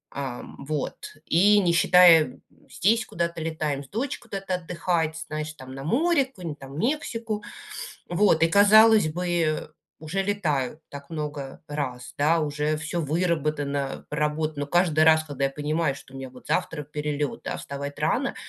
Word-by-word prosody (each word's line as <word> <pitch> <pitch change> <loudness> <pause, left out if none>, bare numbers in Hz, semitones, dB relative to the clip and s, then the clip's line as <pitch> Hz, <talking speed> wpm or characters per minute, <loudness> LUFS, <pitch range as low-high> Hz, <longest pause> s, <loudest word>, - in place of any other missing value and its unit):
А, 135 -3 -4 0.2
вот. 145 +1 -5
И 205 +5 +5
не 175 -4 +2
считая, 165 -6 +6 0.3
здесь 210 - +2
куда-то 170 -1 -3
летаем 155 -3 -2
с 135 - -17
дочкой 235 +1 -4
куда-то 195 -2 -3
отдыхать, 170 -2 -1
знаешь, 155 0 -4
там, 130 -3 -11
на 135 - -7
море, 285 - +3
какую-нибудь 175 - -8
там 135 +1 -8
Мексику, 230 - -2 0.7
вот. 175 -3 +3
И, 165 - +5
казалось 215 +1 +6
бы, 165 -2 -1 0.3
уже 160 +5 -2
летаю 160 -8 -1
так 140 0 -10
много 150 -4 -5
раз, 130 -4 -4
да, 160 +3 +3
уже 150 0 -1
всё 160 +2 -3
выработано, 150 -3 -1
проработано. 150 0 -1
Но 145 - -1
каждый 160 -1 +3
раз, 160 0 +6
когда 140 -3 -2
я - - +1
понимаю, 150 +1 -1
что 130 - -14
у - - -8
меня 135 -1 -7
вот 125 0 -15
завтра 150 -2 -1
перелет, 150 0 -3
да, - - -2
вставать 140 +1 -6
рано- 165 - 0
155 Hz, 155 wpm, -25 LUFS, 145-180 Hz, 0.7 s, считая